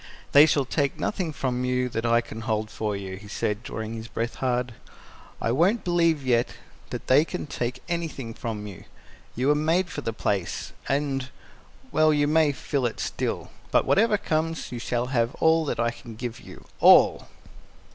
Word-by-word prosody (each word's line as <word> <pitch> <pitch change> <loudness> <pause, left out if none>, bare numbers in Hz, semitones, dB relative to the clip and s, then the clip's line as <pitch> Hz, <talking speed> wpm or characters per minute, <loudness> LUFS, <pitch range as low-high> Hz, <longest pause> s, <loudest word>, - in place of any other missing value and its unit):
"They 145 +2 +8
shall 140 -2 +2
take 140 +1 -1
nothing 185 -6 -1
from 125 -3 -2
you 125 0 +1
that 115 0 -2
I 115 0 +4
can 115 -1 -9
hold 110 -1 -2
for 105 -1 -2
you," 95 -1 -6
he 100 +1 -12
said, 105 0 -2
drawing 110 -2 -5
his 115 0 -6
breath 115 0 -3
hard. 125 -2 -1 0.7
"I 115 - 0
won't 180 - +2
believe 170 -5 +2
yet 120 -2 +1 0.3
that - - -6
they 135 +4 +5
can - - -5
take 125 -4 -4
anything 160 -9 -3
from 110 -3 -5
you. 100 -4 -10 0.5
You 130 +4 +1
were - - +6
made 165 +5 +1
for 145 - -4
the 115 - -2
place, 100 -4 -2 0.2
and 135 -2 -1 0.6
well, 155 0 +4
you 145 -1 +2
may 155 -1 +4
fill 135 -2 -1
it 115 - -7
still. - - -3 0.2
But - - +3
whatever 215 +1 +3
comes, 165 -4 -2
you 120 - -4
shall 120 +1 -1
have 115 +1 +1
all 160 0 +3
that - - -2
I 120 0 +2
can 115 -1 -11
give 120 +1 -5
you - - -13
all!" - - +6
125 Hz, 185 wpm, -26 LUFS, 115-155 Hz, 0.7 s, They